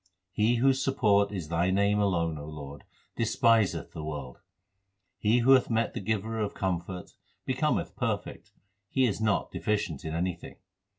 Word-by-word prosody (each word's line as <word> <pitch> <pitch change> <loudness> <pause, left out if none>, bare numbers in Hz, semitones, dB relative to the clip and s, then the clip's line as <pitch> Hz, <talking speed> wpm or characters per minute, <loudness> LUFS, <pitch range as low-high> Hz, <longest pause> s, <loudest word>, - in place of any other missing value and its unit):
He 110 +4 +2
whose 135 +2 +3
support 105 -7 +3
is 90 -7 -5
Thy 85 +2 +1
name 100 +2 +2
alone, 85 -5 +1
O 75 - -7
Lord, 75 -2 -9 0.3
despiseth 115 -2 +2
the 80 - -7
world. 70 -5 -6 0.8
He 110 +3 +3
who 135 - +6
hath 130 -2 +5
met 115 -1 0
the - - -4
Giver 110 +2 -2
of 105 -2 -2
comfort, 90 -1 -3 0.3
becometh - - 0
perfect; - - -3 0.4
he 130 -1 +2
is 110 -2 -1
not 110 -2 +1
deficient 105 -9 -2
in 80 0 -4
anything. 90 0 -3
100 Hz, 155 wpm, -28 LUFS, 85-110 Hz, 0.8 s, who